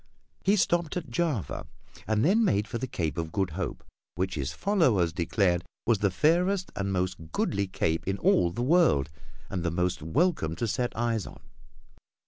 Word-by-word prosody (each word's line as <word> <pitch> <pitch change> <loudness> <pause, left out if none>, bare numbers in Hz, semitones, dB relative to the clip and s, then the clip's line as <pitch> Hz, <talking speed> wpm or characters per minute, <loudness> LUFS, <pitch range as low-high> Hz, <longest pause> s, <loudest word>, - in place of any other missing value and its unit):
He 200 +2 +4
stopped 175 -3 +1
at 155 -8 -6
Java, 145 - -2 0.4
and 110 +2 +2
then 210 +7 +4
made 105 - +2
for 115 - -4
the 130 - -3
Cape 80 - -2
of 80 -1 -3
Good 95 -2 -1
Hope 90 +3 -4 0.3
which 95 +1 -1
his 70 -1 -2
followers 125 - +2
declared 90 0 +1 0.2
was 115 -3 +3
the 100 - +2
fairest 180 - +2
and 100 0 -2
most 90 -3 -2
goodly 100 +3 0
cape 80 -3 -1
in 95 0 0
all 90 -2 +3
the 105 +8 -3
world, 130 - +3 0.4
and 95 - -3
the 85 - +1
most 90 0 -1
welcome 85 - +1
to 115 - -2
set 120 +4 -2
eyes 115 -3 0
on. - - -11
100 Hz, 175 wpm, -28 LUFS, -, 0.4 s, He